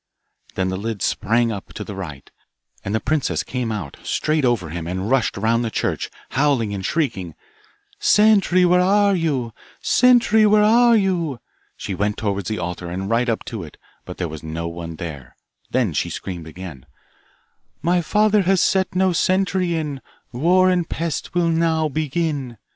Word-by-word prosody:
Then 95 -1 0
the 95 - -2
lid 105 -1 -4
sprang 115 +2 +1
up 100 -3 -7
to - - -5
the 105 - -7
right, 80 -8 -8 0.5
and 100 +2 -2
the - - +2
princess 155 +4 -1
came 125 -3 -3
out, 100 -10 -5
straight 155 -1 0
over 120 -10 +1
him, 85 +1 -5
and 95 +5 -3
rushed 135 -6 +1
round 115 +3 +1
the 115 - -1
church, - - -2 0.2
howling 135 -7 +1
and 95 -1 -4
shrieking 105 - -2 0.6
'Sentry, 200 -4 +4
where 180 0 +4
are 200 +2 +3
you? 140 -9 -1 0.3
Sentry, 235 -3 +4
where 210 0 +5
are 235 +2 +5
you?' 175 - 0 0.4
She - - -5
went 105 +2 -1
towards 100 -3 -2
the 110 - -2
altar, 90 0 -4
and 95 +4 -4
right 120 +2 +2
up 115 - -2
to 115 -5 -5
it, 80 -3 -11 0.3
but - - -9
there 90 - -2
was 80 -1 -8
no 80 +1 -4
one 85 -1 -6
there; 75 -6 -8 0.3
then 120 -9 0
she - - -1
screamed 85 -4 -6
again, 80 -5 -9 1.0
My 175 +2 +2
father 210 +4 +3
has 190 0 +2
set 190 0 +1
no 185 0 +3
sentry 185 0 +1
in, 150 -4 -3 0.3
War 180 +8 +3
and 175 -2 0
Pest 165 0 -3
will 175 -1 +2
now 160 -1 +1
begin. 145 -4 -2
125 Hz, 170 wpm, -21 LUFS, -, 1.0 s, where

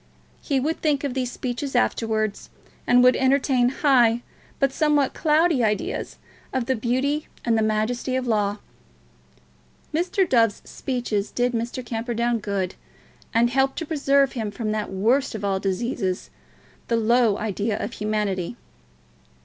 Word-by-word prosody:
He 275 -3 0
would 310 +5 -2
think 295 -3 +1
of 280 -3 -2
these 250 -2 -2
speeches 260 +2 -4
afterwards, 220 -3 0 0.4
and 245 0 +5
would 250 0 +6
entertain 260 -2 +3
high 245 -4 +3 0.4
but 275 -1 +2
somewhat 295 -3 +2
cloudy 315 -3 +2
ideas 210 -2 -2 0.3
of 260 -2 -1
the 260 - +1
beauty 260 +6 -1 0.2
and 230 -2 +2
the 220 - +2
majesty 220 +4 0
of 260 -1 -1
Law. 210 -3 +1 1.4
Mr. 360 +4 +1
Dove's 230 -6 +2
speeches 235 -6 -3
did 245 0 0
Mr. 240 +2 -3
Camperdown 235 0 -1
good, 195 -3 -2 0.6
and 235 +1 +3
helped 270 +1 +1
to 330 - -3
preserve 280 -3 +2
him 225 -5 -3
from 215 +1 -3
that 215 -1 -2
worst 225 +8 +1
of 205 -1 -4
all 195 -1 0
diseases, 195 -1 -2 0.6
a 235 - +2
low 230 -1 +3
idea 210 0 -2
of 225 - -4
humanity. 210 -2 -2
240 Hz, 140 wpm, -24 LUFS, 215-270 Hz, 1.4 s, would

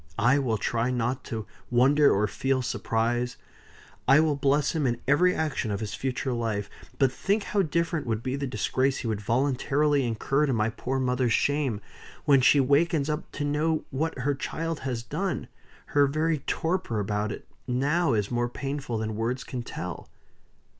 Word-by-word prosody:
I 130 +4 +4
will 120 -5 0
try 115 +3 0
not 125 +1 -1
to 110 -2 -4 0.2
wonder 140 +4 +5
or 100 +2 +2
feel 130 +5 0
surprise; 120 +1 -1 0.7
I 135 +3 +7
will 155 -2 +3
bless 140 +1 +2
him 155 -5 0
in 120 -1 -1
every 175 +6 +4
action 150 -7 -1
of 100 -1 -2
his 105 -2 -4
future 130 +1 -2
life 110 -4 -2 0.3
but 135 -2 +3
think 200 +9 0
how 205 - +1
different 170 -3 -1
would 115 0 -1
be 130 0 -1
the 140 0 -2
disgrace 130 +4 0
he 120 - -4
would 110 -2 -2
voluntarily 140 +5 +1
incur 135 +6 +1
to 135 - +1
my 110 -1 +1
poor 135 +4 -2
mother's 125 -2 +1
shame, 140 -7 +1 0.4
when 140 -2 +5
she 140 +3 +6
wakens 145 +2 +2
up 150 - -4
to 145 - -2
know 155 +2 0
what 155 +3 -2
her 140 +3 0
child 165 +3 -3
has 125 -3 -3
done! 180 +4 -3 0.5
Her 145 -1 +5
very 155 +2 0
torper 160 - -1
about 105 +1 -1
it - - -7 0.2
now 140 +4 +1
is 105 -1 0
more 120 0 0
painful 135 -2 -4
than 110 0 -3
words 115 +4 -2
can 125 - -5
tell." 90 -7 -6
130 Hz, 175 wpm, -27 LUFS, 115-145 Hz, 0.7 s, I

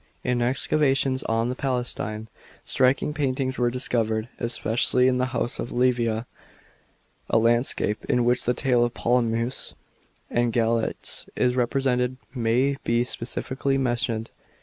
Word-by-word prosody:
In 125 -1 0
excavations 135 +1 +1
on 115 +2 0
tlio - - -12
Palatine, 120 -4 -2 0.4
striking 130 +3 +2
paintings 135 -3 -1
were 120 -1 +3
discovered, 115 -2 0
especially 120 +1 +2
in 125 -1 +2
tho 125 - +2
house 125 -2 -1
of 120 - -4
Livia; 120 -2 +1 1.0
a - - +3
landscape 115 -2 +1
in 125 -3 +1
which 125 +1 +2
the 125 - +1
tale 125 -2 +2
of 120 0 -1
Polyphemus 120 0 0 0.5
and 120 0 +1
v>alater, 115 0 0
is 125 -1 +1
represented 125 0 0 0.2
may 125 +3 +1
be 120 +1 +2
specially 130 +3 -2
mentioned. 120 -3 -1
125 Hz, 125 wpm, -25 LUFS, 115-130 Hz, 1.0 s, were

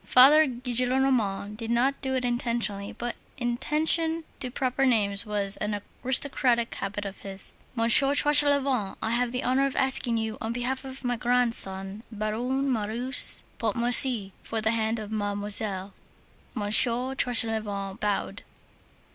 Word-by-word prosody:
Father 295 +5 +5
Gillenormand 245 -4 -1
did 225 0 -7
not 250 +4 0
do 265 0 -2
it 255 -1 -2
intentionally, 235 -5 -3
but 240 0 -6 0.2
inattention 310 +7 0 0.2
to 255 - -3
proper 260 +1 -2
names 210 -5 +1
was 205 -1 -1
an 210 -1 -3 0.2
aristocratic 255 -2 +1
habit 200 +1 -6
of 195 0 -8
his. 195 -1 -1 0.2
"Monsieur 245 +4 +4
Tranchelevent, 280 -7 +3
I 220 - -3
have 240 0 -1
the 250 +1 -4
honor 265 +2 +1
of 275 - -7
asking 265 -3 0
you, 220 -1 -4
on 225 +1 -4
behalf 255 +3 -3
of 265 0 -9
my 245 -1 -2
grandson, 220 -5 +1
Baron 245 +6 -3
Marius 235 +5 +3 0.2
Pontmercy, 235 -1 +4
for 225 - -5
the 220 0 0
hand 225 0 -1
of 215 -1 -8
Mademoiselle." 205 -2 -3 0.6
Monsieur 235 +4 +1
Tranchelevent 220 -6 0
bowed. 205 -1 -3
235 Hz, 135 wpm, -25 LUFS, 210-260 Hz, 0.6 s, Father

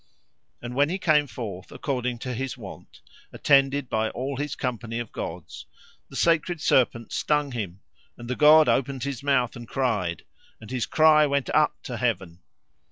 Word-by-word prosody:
And 120 0 -5
when 140 +3 +2
he 185 - -1
came 155 -5 +3
forth 105 -7 -7
according 125 -3 -3
to 125 - -3
his 130 +2 -4
wont, 100 -6 -12 0.3
attended 140 -1 +3
by 110 -1 0
all 135 +3 -4
his 145 0 -3
company 115 -2 -4
of 120 -2 -5
gods, 85 0 -7 0.4
the - - -12
sacred 170 0 +1
serpent 120 -5 +1
stung 150 -2 0
him, 100 -6 -5 0.4
and 120 - -9
the 125 - -2
god 155 +1 +7
opened 135 -1 0
his 140 -2 -4
mouth 135 -4 +1
and 120 -1 -9
cried, 105 - -1 0.4
and 110 +1 -12
his 125 -4 -2
cry 155 -1 +5
went 140 -1 -1
up 155 0 +1
to 120 - -5
heaven. 100 -8 -2
130 Hz, 165 wpm, -25 LUFS, 115-145 Hz, 0.4 s, god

